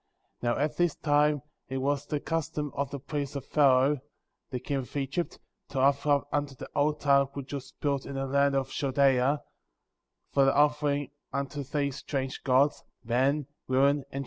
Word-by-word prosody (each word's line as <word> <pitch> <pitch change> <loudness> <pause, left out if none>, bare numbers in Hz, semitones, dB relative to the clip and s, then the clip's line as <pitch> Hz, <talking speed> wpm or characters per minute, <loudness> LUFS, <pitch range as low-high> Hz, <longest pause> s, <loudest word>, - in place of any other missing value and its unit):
8. - - -29
Now, 120 0 +1
at 150 +1 -1
this 175 -2 +2
time 150 -1 +2 0.3
it 135 - -2
was 140 +2 -1
the 150 - -1
custom 150 -2 -2
of 140 -2 -2
the 140 - -5
priest 145 0 -4
of 140 -1 -4
Pharaoh, 140 -1 +4 0.5
the 125 - -3
king 140 +3 -2
of 135 +2 -5
Egypt, 140 +5 -2 0.3
to 140 -2 -3
offer 140 +2 +3
up 145 -1 +4
upon 145 0 +2
the 135 -3 -10
altar 145 -1 +3
which 140 0 -6
was 135 -2 -5
built 140 -2 0
in 140 - -6
the 135 0 -1
land 140 +1 +2
of 135 -1 -1
Chal 140 -2 -1
dea, 135 0 +4 1.0
for 140 -1 +4
the 135 - +3
offering 145 -1 +2 0.2
unto 140 +1 -3
these 140 -1 -2
strange 135 -2 -4
gods, 135 +2 +3 0.2
men, 130 +5 +1 0.2
women, 140 +2 +4
and - - -5
children. 135 - -5
140 Hz, 185 wpm, -29 LUFS, 135-145 Hz, 1.0 s, Pharaoh